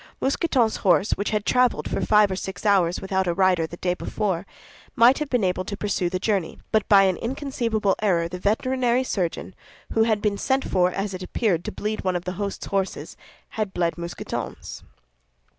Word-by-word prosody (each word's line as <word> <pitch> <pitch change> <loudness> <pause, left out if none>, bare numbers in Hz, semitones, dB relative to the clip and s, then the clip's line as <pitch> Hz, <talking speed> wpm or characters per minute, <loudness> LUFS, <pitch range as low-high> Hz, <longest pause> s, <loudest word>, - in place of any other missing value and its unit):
Mousqueton's 265 -5 +1
horse 190 +1 +2
which 200 - -1
had 210 -1 -1
traveled 250 -1 +2
for - - -2
five 210 -2 +4
or - - -1
six 190 +1 -6
hours 185 -4 +3
without 190 -1 -1
a 170 - 0
rider 185 -3 +2
the 170 - -10
day 180 0 0
before, 195 -1 -3 0.5
might 240 +3 +6
have 300 -2 -3
been 245 -5 +1
able 185 0 0
to 200 +2 -6
pursue 200 -4 -1
the 185 - -2
journey; 195 -3 -1
but 215 -1 +1
by 200 -1 +7
an 190 -2 +2
inconceivable 230 -6 -1
error 175 -5 +2
the 180 +1 -7
veterinary 245 +5 +1
surgeon, 190 -5 -3 0.4
who 225 - +2
had 220 -2 +2
been 205 -1 -1
sent 265 +1 0
for, 180 -1 +2
as 195 +1 -3
it 185 - -6
appeared, 185 -2 0
to - - -3
bleed 215 +1 -4
one 185 -1 0
of 175 - -3
the 180 - -2
host's 200 -1 -4
horses, 195 -1 -3 0.3
had 215 -4 -4
bled 170 -1 0
Mousqueton's. 170 0 -6
200 Hz, 195 wpm, -24 LUFS, 180-220 Hz, 0.5 s, by